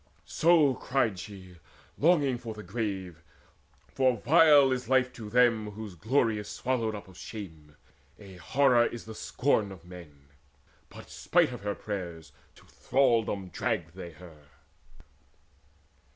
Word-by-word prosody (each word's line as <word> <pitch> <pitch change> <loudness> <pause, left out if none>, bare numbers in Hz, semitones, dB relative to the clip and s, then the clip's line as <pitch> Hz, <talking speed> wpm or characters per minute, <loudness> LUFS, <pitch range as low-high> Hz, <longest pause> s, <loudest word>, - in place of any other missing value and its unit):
So 160 -4 +3
cried 120 -7 -1
she, 95 -3 -11 0.4
longing 145 -6 +2
for 115 -3 -7
the 105 - -9
grave; 95 -8 -4 0.7
for 130 -2 +2
vile 145 +1 +5
Is 130 0 -3
life 130 -1 +2
to 110 -3 -9
them 115 -2 +3
whose 105 -1 -8
glory 110 - 0
is 105 - -8
swallowed 115 -4 -2
up 100 - -9
Of 95 - -16
shame: 80 -9 -10 0.4
a 95 -3 -13
horror 120 - +3
is 120 - -8
the 110 - -8
scorn 110 -3 0
of 90 -3 -12
men. 75 -6 -14 0.6
But, - - -13
spite - - +2
her 100 +1 -4
prayers, 85 -6 -6 0.2
to - - -19
thraldom 115 -8 0
dragged 90 -4 -3
they 85 -2 -9
her. 80 -3 -15
105 Hz, 135 wpm, -28 LUFS, 90-125 Hz, 0.7 s, vile